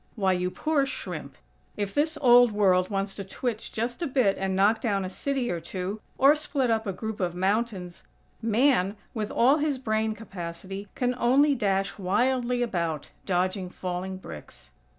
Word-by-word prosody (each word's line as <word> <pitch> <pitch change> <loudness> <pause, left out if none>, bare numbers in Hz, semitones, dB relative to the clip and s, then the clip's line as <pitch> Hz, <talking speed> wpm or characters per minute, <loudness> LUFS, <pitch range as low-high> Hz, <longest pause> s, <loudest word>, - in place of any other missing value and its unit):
Why, 190 -4 +2
you 180 0 0
poor 290 +6 0
shrimp! - - -6 0.4
if 200 -1 -2
this 310 +1 +1
old 245 -1 +7
World 185 -3 +3
wants 195 -1 -2
to 200 - -4
twitch 220 +3 -4
just 240 +7 -3
a 335 - 0
bit 250 -8 +2
and 190 0 -2
knock 210 +3 +3
down 200 -5 0
a 185 - -5
city 270 +2 -1
or 175 - -2
two, 185 +5 -5 0.2
or 275 +2 +7
split 280 -5 -1
up 220 -1 0
a - - 0
group 220 +3 -5
of 175 -2 -1
mountains, 190 -2 -1 0.4
Man, 225 -3 +2 0.2
with 215 -2 -3
all 265 +5 +4
his 295 -2 0
brain 220 -3 -1
capacity, 195 -1 -7
can 250 0 0
only 280 +5 +4
dash 195 -4 0
wildly 245 +5 +1
about, 170 - -2 0.2
dodging 185 0 0
falling 185 +1 -4
bricks. 80 - -11
210 Hz, 170 wpm, -27 LUFS, 190-245 Hz, 0.4 s, old